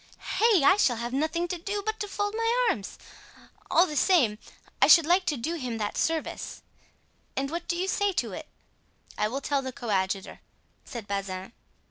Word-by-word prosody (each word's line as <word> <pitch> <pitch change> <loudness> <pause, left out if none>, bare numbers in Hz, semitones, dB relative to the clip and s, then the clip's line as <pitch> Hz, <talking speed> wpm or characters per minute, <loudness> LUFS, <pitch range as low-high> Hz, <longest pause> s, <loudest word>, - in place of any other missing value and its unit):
Hey! 435 -8 +5
I 380 +7 +6
shall 255 -12 +3
have 235 +2 -4
nothing 320 +5 0
to 360 - -3
do 405 +4 -3
but 435 0 -2
to 415 - -3
fold 410 +1 -2
my 460 +2 +2
arms! 205 - -2 0.7
All 345 - +5
the 305 - -6
same, 270 - +3 0.4
I - - +7
should 335 -3 +8
like 360 +3 +3
to 295 - +1
do 280 +8 -3
him 250 -6 -4
that 210 -1 -3
service—what 325 -1 -5
do 345 - 0
you 370 +2 -1
say 405 +1 +1
to - - -1
it?" - - -7 0.7
"I 210 - +1
will 265 +6 -4
tell 280 -1 0
the 260 -1 -5
coadjutor," 195 -5 -2 0.5
said 235 -6 -7
Bazin. 195 0 -4
310 Hz, 175 wpm, -27 LUFS, 235-375 Hz, 0.7 s, should